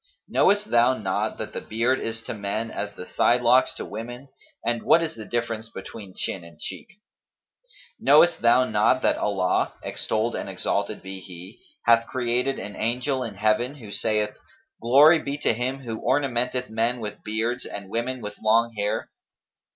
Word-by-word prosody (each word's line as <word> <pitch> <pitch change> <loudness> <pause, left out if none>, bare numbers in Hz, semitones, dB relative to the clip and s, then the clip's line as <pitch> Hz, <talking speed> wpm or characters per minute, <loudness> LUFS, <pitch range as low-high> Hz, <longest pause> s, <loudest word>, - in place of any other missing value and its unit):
Knowest 205 +1 +2
thou 120 +2 +4
not 95 -3 -2
that - - -6
the - - -4
beard 120 +4 0
is 115 0 -4
to - - -5
men 105 +2 -3
as 105 0 -5
the 90 - -8
sidelocks 125 +4 +3
to - - -6
women; 120 +5 -7 0.4
and 120 -1 0
what 165 - +4
is 160 - -3
the 110 -1 -9
difference 115 -1 -3
between 100 -4 -9
chin 90 - -3
and 85 -2 -14
cheek?[FN#257] 200 -3 -8 1.0
Knowest 175 0 +5
thou 120 +2 +5
not 110 +3 +2
that - - +3
Allah 95 -3 +1
(extolled 110 +2 -1
and - - -4
exalted - - -2
be 95 0 -7
He!) 90 -1 -11 0.3
hath 115 0 +5
created 125 +2 0
an 100 -1 -7
angel 125 +4 -1
in 115 -5 -5
Heaven, 110 +6 +1
who 110 -8 -11
saith: 105 0 0 0.5
'Glory 145 +7 +7
be 140 -1 -4
to 145 - +1
Him 130 +4 -3
who 115 -4 -5
ornamenteth 125 -2 0
men 115 +2 0
with 105 -2 -7
beards 115 +3 -1
and 100 -1 -7
women 125 +2 -2
with 105 0 -7
long 115 +2 +3
hair?' 105 +1 -2
115 Hz, 165 wpm, -25 LUFS, 105-125 Hz, 1.0 s, Glory